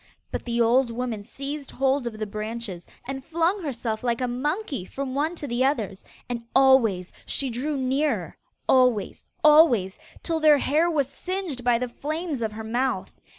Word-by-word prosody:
But - - -4
the 235 -1 -1
old 240 +2 +4
woman 230 -2 -3
seized 275 +6 -6
hold 270 -1 +1
of 220 -2 -5
the 215 - -2
branches 215 -3 -5 0.2
and 270 0 -5
flung 335 +6 0
herself 235 -7 -3
like 235 -2 0
a 250 - 0
monkey 280 - -2
from 265 +7 -5
one 305 +5 0
to 305 - -6
the 245 -1 0
others, 220 -9 -1 0.2
and 240 -1 -3
always 235 -9 +4
she 270 -3 -1
drew 280 +5 -2
nearer 260 - 0 0.3
always, 250 -6 +2 0.2
always 295 - +5 0.2
till 330 -1 0
their 305 -2 +6
hair 310 +5 +2
was 290 -5 +1
singed 360 -5 -4
by 240 -1 +4
the 250 +1 -2
flames 305 +2 -4
of 220 -1 -2
her 220 +1 -6
mouth. 245 +4 -2
255 Hz, 170 wpm, -25 LUFS, 230-295 Hz, 0.3 s, their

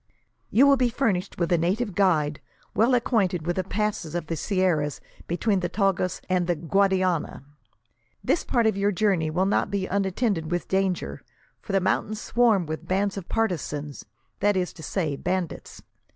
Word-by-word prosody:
"You 260 +5 +5
will 280 -1 +6
be 250 -1 +2
furnished 225 -7 -1
with 170 -1 -1
a 175 - +4
native 200 +6 0
guide, 155 -6 +2 0.3
well 235 +4 +3
acquainted 195 -9 +1
with 175 +1 -1
the 185 - +1
passes 200 -5 -2
of 175 - -2
the 165 - -3
sierras 165 -5 0 0.3
between 195 +4 +1
the 175 -1 -2
Tagus 195 -2 0
and 180 -2 +1
the 175 - +1
Guadiana. 185 -2 +1 0.8
This - - +1
part 235 -3 +1
of 220 - +3
your 200 +1 +1
journey 190 -5 +1
will 180 +4 +1
not 195 - +1
be 200 -1 -1
unattended 195 -3 -1
with 175 0 -2
danger, 190 -2 -1 0.4
for - - -7
the 195 - +3
mountains 195 +3 -1
swarm 225 -7 +2
with 160 +2 -6
bands 195 +2 0
of 195 -4 -7
partisans; 150 -9 -2 0.4
that 205 -1 +2
is 180 -1 -1
to 165 - -12
say, 160 -3 -2
bandits. 180 +2 -4
185 Hz, 170 wpm, -25 LUFS, 170-205 Hz, 0.8 s, will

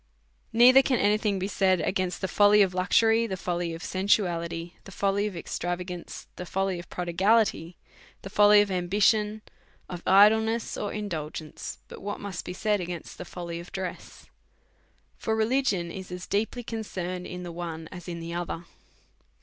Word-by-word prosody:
Neither 250 +3 +8
can 265 -2 +1
any 210 0 +3
thing 210 -3 0
be 190 +1 -2
said 190 -3 +2
against 185 -1 -1
the 190 - 0
folly 205 +2 +5
of 185 -2 -1
luxury, 225 +5 +3
the 190 -3 -4
folly 175 -1 -2
of 165 - -9
sensuality, 175 -3 0
the 195 - -10
folly 200 +2 0
of 200 - -6
extrava 175 +1 -3
g 180 - -5
ance, 175 - -9
the 180 - -5
folly 190 -1 -1
of 175 - -11
prodigality, 180 0 +1 0.5
the 195 - -6
folly 205 0 +7
of 205 -1 -1
ambition, 210 +4 +1 0.4
of 180 -2 -7
idleness 220 +3 +4
or 205 - -3
indulgence, 160 -7 -5
but - - -11
what 205 +1 -4
must 195 -3 -6
be - - -5
said 210 +2 0
against 175 -2 -7
the 180 - -6
folly 170 -1 -6
of 175 - -11
dress; 190 -2 -6 0.9
for 220 - 0
religion 220 -6 +1
is 185 0 -8
as 180 -1 -6
deeply 225 +4 -1
concerned 185 -6 -5
in 180 0 -7
the 175 - -6
one 165 -2 -6
as 175 -1 -9
in 170 -1 -5
the, 165 0 -6
other. 175 -1 -4
190 Hz, 175 wpm, -27 LUFS, 175-210 Hz, 0.9 s, Neither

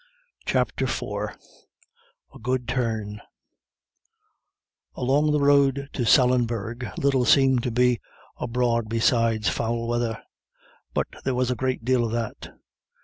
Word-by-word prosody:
CHAPTER - - 0
IV - - -3 1.0
A - - -13
GOOD 125 +1 -1
TURN 110 -5 -2 1.7
Along 145 +4 +2
the 150 - +2
road 140 -1 +3
to 120 -4 -1
Sallinbeg 120 -1 +2
little 140 -5 +2
seemed 130 0 +4
to 125 - -2
be 125 0 +2 0.4
abroad 115 -2 0
besides 115 -2 +2
foul 115 +2 -2
weather, 120 -2 -1 0.8
but - - +1 0.2
there 130 - -1
was 125 0 +1
a - - 0
great 130 -2 -2
deal 130 -1 +2
of 115 - -2
that. 115 -2 -4
120 Hz, 120 wpm, -25 LUFS, 115-130 Hz, 1.7 s, seemed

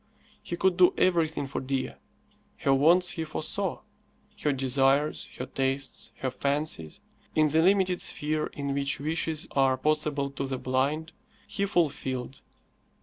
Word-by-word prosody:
He 175 - -5
could 185 -1 +2
do 180 -1 +5
everything 165 -5 +2
for 135 - -4
Dea. 130 0 -2 0.7
Her 135 - +2
wants 170 +6 +4
he 165 - -3
foresaw; 155 - -3 0.6
her 150 - +2
desires, 135 +2 +1
her 125 - -4
tastes, 135 +1 -3
her 130 - -1
fancies, 140 - -1 0.3
in 155 -1 +4
the 160 +2 +3
limited 185 0 +3
sphere 155 +1 0
in 140 -1 -3
which 140 +1 0
wishes 155 +1 0
are 135 -1 +3
possible 150 -1 0
to 140 0 -4
the 130 -1 -2
blind, 140 +6 -1 0.3
he 200 0 -2
fulfilled. 135 -8 -1
145 Hz, 140 wpm, -28 LUFS, 135-160 Hz, 0.7 s, do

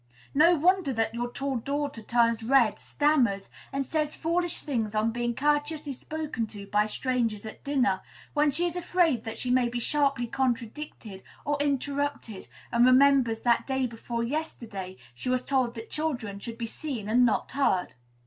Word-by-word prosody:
No 330 +5 +6
wonder 350 -1 +3
that 225 -1 0
your 240 +1 -2
tall 275 0 -2
daughter 280 0 -3
turns 230 0 +2
red, 235 -2 +3
stammers, 250 -10 +1 0.2
and 275 0 -1
says 305 +1 -1
foolish 345 +1 0
things 225 -7 -2
on 215 +1 +2
being 240 0 -2
courteously 295 +1 0
spoken 300 -4 -4
to 205 -2 -9
by 210 +1 +2
strangers 230 -3 -1
at 220 - -9
dinner, 260 -9 +1 0.3
when 295 0 +3
she 315 +5 0
is 345 -1 -2
afraid 340 -9 +1
that 225 - -5
she 250 - -2
may 250 -1 +3
be 240 - -3
sharply 275 -1 +1
contradicted 240 -4 -3 0.2
or 290 0 0
interrupted, 285 -5 -2 0.2
and 235 0 +4
remembers 255 -3 +5
that 240 -1 +2
day 265 -1 +1
before 235 0 -4
yesterday 230 -9 -4 0.2
she 125 - -5
was 255 0 0
told 255 -3 +1
that 225 0 -8
children 245 -10 -2
should 230 +2 -7
be 235 - -3
seen 235 -3 -5
and 240 +3 +4
not 235 -3 +1
heard. 260 -10 +1
255 Hz, 170 wpm, -28 LUFS, 225-290 Hz, 0.3 s, No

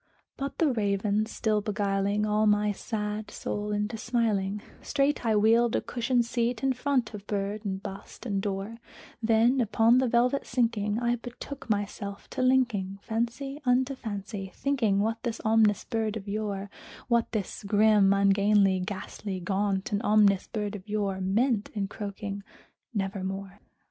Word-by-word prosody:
'" - - -47
But 275 0 -4
the 315 -4 +3
Raven 210 -1 +1
still 215 -2 0
beguiling 205 0 0
all 215 0 +2
my 210 0 +3
sad 210 0 -4
soul 210 0 -4
into 210 +2 -1
smiling, 210 -4 0 0.2
Straight 285 -1 +1
I 225 -2 +2
wheeled 225 +3 +4
a - - +1
cushioned 240 0 0
seat 235 +1 -1
in 270 -1 +3
front 255 -3 0
of 205 -1 -9
bird 205 +1 -2
and 190 -1 -3
bust 195 +5 -9
and 200 -4 -1
door; 200 +3 -4 0.4
Then, 230 +3 +4
upon 230 +2 +4
the 260 - +2
velvet 245 +3 +2
sinking, 225 -4 0
I 240 0 +1
betook 245 +3 -9
myself 200 -1 -3
to - - -2
linking 240 -7 +2
Fancy 240 +6 -3
unto 255 +1 +2
fancy, 200 -5 -6
thinking 230 -8 +1
what 225 +2 -1
this 235 -2 -3
ominous 220 -2 +4
bird 220 -1 -2
of 200 -1 -9
yore 200 -1 -3 0.4
What 235 -2 +2
this 215 -1 -3
grim, 205 -1 +4
ungainly, 200 0 +4
ghastly, 190 +1 -5
gaunt 195 +2 -1
and 205 0 0
ominous 205 -3 +4
bird 210 -2 -3
of 200 +1 -10
yore 200 -2 -1
Meant 215 +3 +1
in 200 -2 -1
croaking 200 0 -5 0.5
"Nevermore." 195 -1 -4
210 Hz, 155 wpm, -28 LUFS, 200-235 Hz, 0.5 s, wheeled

